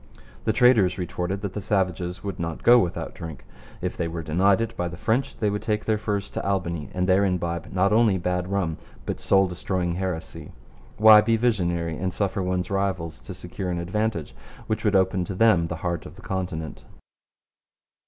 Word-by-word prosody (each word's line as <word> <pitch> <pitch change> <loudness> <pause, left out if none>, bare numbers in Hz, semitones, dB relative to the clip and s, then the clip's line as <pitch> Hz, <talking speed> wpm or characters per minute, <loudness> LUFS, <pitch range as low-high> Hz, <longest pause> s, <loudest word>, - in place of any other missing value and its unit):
The - - +3
traders 110 -5 +4
retorted 90 +2 -3
that 100 -3 -4
the 105 - -4
savages 90 -3 -1
would 100 -1 -5
not 85 -1 -4
go 120 +1 +8
without 90 -7 -2
drink. 80 -5 -8 0.4
If - - -2
they 85 - -2
were 80 0 -5
denied 95 +6 +3
it 115 -1 -2
by 90 - -2
the 90 0 -7
French 120 +8 0
they 105 -2 0
would 105 - -2
take 105 -1 -1
their 110 -1 +1
furs 100 -2 -2
to - - -4
Albany, 85 -6 -2
and 90 0 -1
there 95 +1 +4
imbibe 85 -3 -2
not 95 +2 +2
only 110 -3 +4
bad 90 0 -1
rum 90 -5 -1 0.3
but - - -3
soul 95 0 +4
destroying 90 -1 -2
heresy. 90 -2 -5 0.4
Why 110 0 +9
be 115 +1 +2
visionary 85 -8 0
and 95 +1 -1
suffer 100 +2 -1
one's 90 0 -2
rivals 95 -4 -1
to - - -9
secure 95 - -6
an 90 - -1
advantage 90 -1 -2 0.3
which 110 0 -2
would 105 -2 +2
open 95 -1 +3
up 90 - -3
to 95 - -4
them 95 -6 +4
the 80 - -4
heart 85 -2 -2
of - - -13
the - - -15
continent? 90 -4 -4
95 Hz, 195 wpm, -25 LUFS, 85-105 Hz, 0.4 s, Why